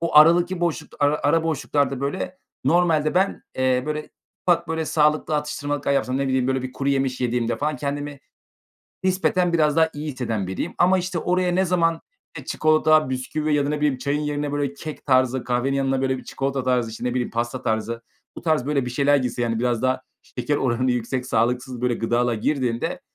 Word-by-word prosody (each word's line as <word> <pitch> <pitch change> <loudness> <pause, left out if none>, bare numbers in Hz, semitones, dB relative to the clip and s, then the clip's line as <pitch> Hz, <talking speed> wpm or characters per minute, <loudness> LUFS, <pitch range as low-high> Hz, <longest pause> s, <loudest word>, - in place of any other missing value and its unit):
o 170 -2 0
aradaki 175 +3 +6
boşlukta, 170 -2 -2
ara 145 +1 +2
ara 160 +3 +3
boşluklarda, 145 -4 0
böyle, 185 +6 -3 0.3
normalde 160 0 +3
ben, 190 +2 +1 0.2
eee, 130 -1 +2
böyle, 150 0 -3 0.4
ufak, 170 -1 +2
böyle, 160 0 -1
sağlıklı 150 0 +2
atıştırmalıklar 145 -1 -2
yapsam 130 -1 0
ne 135 -1 0
bileyim, 130 -1 +1
böyle, 130 -1 0
bir 130 - -5
kuru 140 +1 -2
yemiş 135 -2 0
yediğimde 120 -1 0
falan 150 0 -1
kendimi 145 +1 -4 0.8
nispeten 185 -1 +1
biraz 150 -3 +3
daha 160 0 +4
iyi 150 +1 -4
hisseden 115 -7 -3
biriyim. 95 - -4
Ama, 185 +2 +4
işte, 180 -2 -2
oraya 180 +1 +1
ne 190 +2 +2
zaman, 165 -2 +1 0.4
eee, - - -9
çikolata, 155 -2 +3
bisküvi 150 +4 -2
ya 145 -1 +2
da 145 - -1
ne 150 - 0
bileyim 145 -3 +1
çayın 140 +3 -1
yerine, 145 -1 -2
böyle, 145 -1 -1
kek 155 +2 -8
tarzı, 130 -1 +2
kahvenin 130 +3 0
yanına, 135 -1 0
böyle, 130 0 0
bir - - -10
çikolata 135 -1 -2
tarzı, 125 -3 +1
işte, 115 - -8
ne 125 - 0
bileyim, 125 -1 -1
pasta 120 +2 -2
tarzı, 115 -1 -2 0.3
bu - - -8
tarz, 155 -6 +1
böyle, 140 -3 0
bir - - -3
şeyler 145 +2 +3
girse, 125 -2 -2
yani, 115 -1 0
biraz 120 -1 0
daha 130 0 +1 0.2
şeker 125 +4 -2
oranı 130 -1 +1
yüksek 125 +1 -2
sağlıksız, 125 +1 0
böyle, 125 -1 +1
gıdalar 120 +1 +1
girdiğinde 120 0 -1
140 Hz, 195 wpm, -23 LUFS, 125-155 Hz, 0.8 s, aradaki